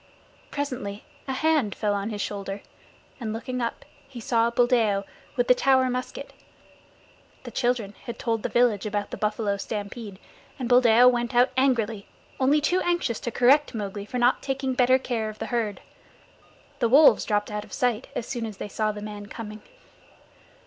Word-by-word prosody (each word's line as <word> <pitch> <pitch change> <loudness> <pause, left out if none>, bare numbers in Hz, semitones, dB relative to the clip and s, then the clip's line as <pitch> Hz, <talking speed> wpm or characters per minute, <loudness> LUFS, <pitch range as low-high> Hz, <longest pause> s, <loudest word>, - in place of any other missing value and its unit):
Presently 255 -8 -4 0.2
a 265 - -1
hand 295 -7 +1
fell 210 -2 0
on 200 +1 -2
his 210 -2 -4
shoulder, 200 -1 -5 0.6
and 225 -4 -3
looking 245 +3 -4
up 235 - -3 0.2
he 265 -3 -9
saw 235 -2 +2
Buldeo 235 -5 +2 0.3
with 245 -2 +1
the - - +7
Tower 260 0 +3
musket. 250 0 -5 1.1
The - - -8
children 240 -5 -1
had 235 - -6
told 225 -2 -1
the - - -2
village 235 -4 +2
about 205 -1 -3
the - - -5
buffalo 210 -1 -1
stampede, 205 0 -6 0.4
and 255 - -3
Buldeo 245 -1 +6
went 240 0 +1
out 245 +2 +5
angrily, 230 -6 +1 0.3
only 275 +3 +4
too 355 +5 +1
anxious 345 -10 0
to - - -3
correct 255 +4 +3
Mowgli 205 -1 -5
for 250 - -4
not 245 +1 +3
taking 270 -1 -2
better 255 +1 +4
care 235 -4 -2
of 215 - -9
the - - -4
herd. 220 -4 -1 1.0
The 235 - +2
wolves 285 +5 +7
dropped 210 -1 -1
out 210 0 -3
of - - -16
sight 245 -1 0
as 230 - -3
soon 240 -4 -3
as 210 -3 -9
they 205 - -6
saw 215 +1 0
the 210 0 -8
man 205 -1 -7
coming. 215 -1 -8
235 Hz, 175 wpm, -25 LUFS, 210-255 Hz, 1.1 s, the